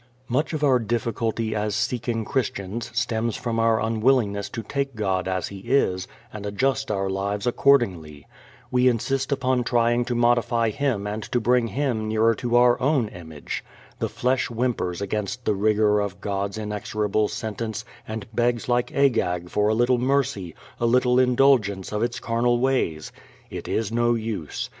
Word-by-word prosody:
Much 130 +6 0
of 155 -2 -3
our 130 -3 +4
difficulty 115 0 -1
as 105 -1 -1
seeking 120 0 -1
Christians 115 -3 -2
stems 115 -1 -1
from 115 -1 -2
our 115 0 +3
unwillingness 110 -2 +1
to 115 - -5
take 140 -1 -3
God 95 -4 -1
as 95 -2 -2
He 100 - -8
is 95 -5 +1 0.3
and 105 -1 -7
adjust 130 +7 0
our 95 -2 0
lives 100 +1 -2
accordingly. 95 - +2 0.5
We 125 0 +3
insist 130 +3 0
upon 130 -2 +1
trying 120 0 +2
to 120 0 -2
modify 120 -1 +2
Him 115 -5 -1
and 105 +1 -3
to 120 - +2
bring 120 +1 +2
Him 120 -4 -1
nearer 110 +1 +3
to 120 +1 -2
our 120 0 +5
own 130 -5 +2
image. 80 -5 -7 0.4
The - - -1
flesh 130 +1 0
whimpers 115 -7 -2
against 105 +4 -3
the 105 - +2
rigor 105 +1 +2
of 100 -2 -3
God's 100 0 -3
inexorable 105 0 -1
sentence 110 +1 -4 0.2
and 110 +2 -5
begs 120 0 0
like 120 0 +1
Agag 90 -11 +1
for 105 0 +2
a 110 - +2
little 120 +2 +3
mercy, 130 - 0 0.2
a 120 - +2
little 125 +1 +3
indulgence 125 -7 +3
of 105 - -1
its 120 +1 -1
carnal 120 +1 +1
ways. 120 -12 0 0.4
It - - -6
is 110 -1 -1
no 120 0 +2
use. 110 -9 -4
115 Hz, 160 wpm, -24 LUFS, 105-125 Hz, 0.5 s, our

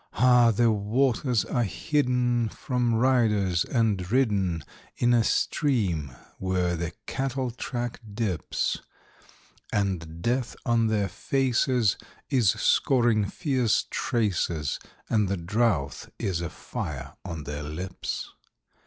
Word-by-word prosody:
Ah! 125 +1 +5
the 115 +1 +3
waters 120 +3 +1
are 120 - 0
hidden 125 - +1
from 125 -1 -1
riders 110 -8 +3
and 105 -6 0
ridden 100 - +1 0.3
In 120 0 +3
a 115 -1 +4
stream 95 - 0 0.2
where 90 -2 0
the 85 0 -3
cattle 130 -1 -2
track 120 0 -4
dips; 100 -5 -1 0.9
And 85 -5 -1
Death 120 0 0
on 115 -2 +3
their 105 -2 +1
faces 125 -3 +1 0.3
is 120 -7 +4
scoring 120 -4 +3
fierce 130 -7 +1
traces, 95 - 0 0.3
And 105 -3 +2
the 100 - 0
drouth 85 - 0
is 90 -4 -1
a 85 - -3
fire - - -6
on 80 -3 -5
their 75 +1 -5
lips. 80 +5 -5
110 Hz, 110 wpm, -27 LUFS, 95-125 Hz, 0.9 s, Ah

